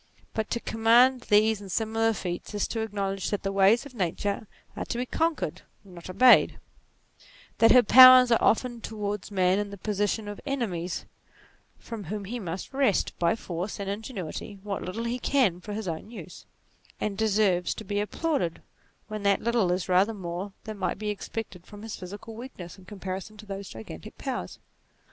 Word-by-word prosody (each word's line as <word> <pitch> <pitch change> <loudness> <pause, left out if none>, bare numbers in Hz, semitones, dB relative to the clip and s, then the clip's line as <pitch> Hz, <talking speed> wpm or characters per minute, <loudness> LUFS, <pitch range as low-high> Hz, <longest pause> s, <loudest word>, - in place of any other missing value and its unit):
But 220 -1 -2
to 235 - -1
commend 235 +4 +4
these 210 0 +4
and 195 -2 -9
similar 225 +1 +1
feats, 180 +1 -5
is 205 - 0
to 230 - -3
acknowledge 200 -3 -2
that 205 - -2
the 195 - -1
ways 195 +5 +4
of 285 - -11
Nature 200 +1 -2 0.3
are - - -4
to - - -4
be 250 - -1
conquered, 300 - -1 0.2
not 180 -3 -12
obeyed: 250 +7 +6 1.0
that 225 - +7
her 250 -1 +8
powers 255 +1 +9
are 230 - +4
often 240 +1 +1
towards 210 -3 -4
man 190 -1 +2
in 205 0 -2
the 200 - -9
position 210 +2 -1
of 205 0 -7
enemies, 195 - -3 0.7
from 220 -4 -8
whom 205 0 -5
he 240 +5 -4
must 185 +4 -6
wrest, 265 -8 +1
by 170 +3 +2
force 185 -1 -5
and 200 0 -3
ingenuity, 205 - -6
what 205 -1 -3
little 195 +6 -4
he 235 +2 -2
can 235 -11 +2
for 210 - -8
his 215 -1 -4
own 165 +5 -5
use, 235 - -10 0.5
and 210 -2 -2
deserves 200 -4 +2
to - - -7
be 205 0 -2
applauded 210 - -2 0.4
when 215 -1 -5
that 200 -1 +2
little 230 -6 +2
is 180 0 -1
rather 190 +4 +3
more 180 +1 -5
than 215 -2 -7
might - - -1
be 210 +1 -2
ex 205 - -7
NATURE 225 - -3 0.2
21 - - -25
pected - - -30
from 205 -1 -11
his 225 -1 -5
physical 205 +4 -9
weakness 220 -8 -9
in 185 - -16
comparison 195 +1 -6
to 215 - -11
those 195 -1 -6
gigantic 110 -8 -10
powers. - - -4
205 Hz, 185 wpm, -27 LUFS, 190-225 Hz, 1.0 s, powers